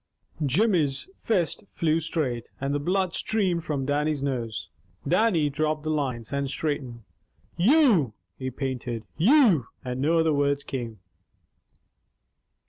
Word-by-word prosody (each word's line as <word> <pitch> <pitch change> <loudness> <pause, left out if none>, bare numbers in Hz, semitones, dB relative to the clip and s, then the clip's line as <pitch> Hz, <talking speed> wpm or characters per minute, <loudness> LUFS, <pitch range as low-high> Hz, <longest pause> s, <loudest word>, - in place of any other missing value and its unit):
Jimmy's 150 - +1
fist 185 -8 0
flew 160 -1 +1
straight, 140 -7 -2
and 135 +1 -1
the 145 - 0
blood 185 +3 0
streamed 185 -6 0
from 140 -4 -2
Dannie's 145 0 0
nose. 120 -5 -3 0.4
Dannie 180 -2 +3
dropped 155 +1 -1
the 155 - -1
lines, 130 -5 -2
and 140 -1 -1
straightened. 135 -6 -3 0.5
"You 205 - +4
" 90 0 -52
he 130 - -2
panted. 125 -3 -4
"You 200 - +5
" - - -30
And 125 +1 -3
no 160 +4 +3
other 160 -1 +3
words 140 0 +1
came. 115 -6 -5
145 Hz, 130 wpm, -26 LUFS, 130-170 Hz, 0.5 s, You